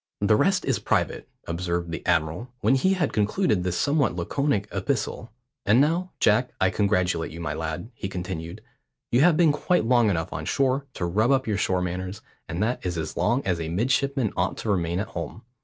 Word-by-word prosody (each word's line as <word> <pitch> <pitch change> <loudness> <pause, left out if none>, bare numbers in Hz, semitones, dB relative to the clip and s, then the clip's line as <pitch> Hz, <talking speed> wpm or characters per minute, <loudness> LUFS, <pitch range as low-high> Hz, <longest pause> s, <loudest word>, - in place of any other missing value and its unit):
The - - +4
rest - - +2
is - - +1
private," - - -1 0.2
observed 85 0 -2
the 85 - -5
admiral, 85 +8 0
when - - +3
he 185 +9 +3
had 175 -6 0
concluded 105 - +1
this 90 -1 -1
somewhat 145 - +2
laconic 105 - 0
epistle. 110 +2 -2 0.3
"And 110 +4 +4
now, 165 +6 +2
Jack, 115 +4 +3
I 95 0 +3
congratulate 90 -4 +1
you, 85 - -8
my 80 -3 -3
lad," 80 +8 -4
he 95 - -5
continued. 90 +1 -6 0.5
"You 120 - +4
have 165 0 +5
been 170 -3 +5
quite 150 -2 +1
long 120 -2 +4
enough 80 -4 -1
on - - -4
shore 135 +1 +1
to 85 - -2
rub 105 +7 +1
up 135 -1 +3
your 105 -3 0
shore 90 -2 +1
manners, 90 +2 -4 0.2
and 85 +5 -2
that 120 +3 -1
is 90 -2 -2
as 80 -1 -4
long 125 +3 +1
as 90 -3 0
a 80 - -3
midshipman 130 - 0
ought 90 +1 0
to 110 - -2
remain 85 -2 0
at 100 - -3
home. 90 +6 -6
100 Hz, 200 wpm, -25 LUFS, 85-130 Hz, 0.5 s, have